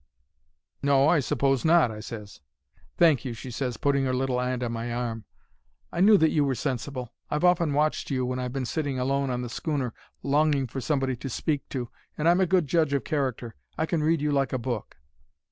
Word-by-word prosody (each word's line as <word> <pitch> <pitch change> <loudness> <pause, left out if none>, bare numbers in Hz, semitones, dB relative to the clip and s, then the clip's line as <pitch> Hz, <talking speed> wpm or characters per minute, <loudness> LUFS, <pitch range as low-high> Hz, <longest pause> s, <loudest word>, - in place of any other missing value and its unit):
"'No, 140 0 +4
I 165 - +4
s'pose 135 -1 +1
not,' 160 -7 +4
I 105 - -7
ses. 105 -6 -9 0.6
"'Thank 155 -8 +4
you,' 125 -3 -4
she 125 +2 -8
ses, 125 -1 -3
putting 140 0 +1
'er 130 - 0
little 130 -1 0
'and 125 0 -1
on 120 - -2
my 115 +1 -4
arm. 115 -3 -3 0.7
'I 170 - -1
knew 210 +2 +7
that 160 -3 +3
you 150 - +2
were 135 -2 0
sensible. 130 -1 -4 0.2
I've 150 +2 -1
often 175 -4 +3
watched 150 +2 0
you 130 -3 0
when 125 0 -2
I've 125 -1 -3
been 135 0 -3
sitting 140 0 -2
alone 135 +2 0
on 125 0 -2
the - - -4
schooner, 135 -2 -2 0.3
longing 145 -1 +2
for 130 +2 -5
somebody 135 -1 0
to 135 - -6
speak 145 +3 -2
to. 125 -3 -4 0.3
And 155 - 0
I'm 175 +2 +5
a 185 - +3
good 180 -2 +3
judge 155 0 +1
of 140 -4 0
character. 130 -5 -2 0.2
I 160 - +1
can 160 -1 -1
read 160 0 +2
you 150 0 0
like 135 -2 +1
a - - +1
book.' 120 - -4
135 Hz, 215 wpm, -26 LUFS, 125-150 Hz, 0.7 s, knew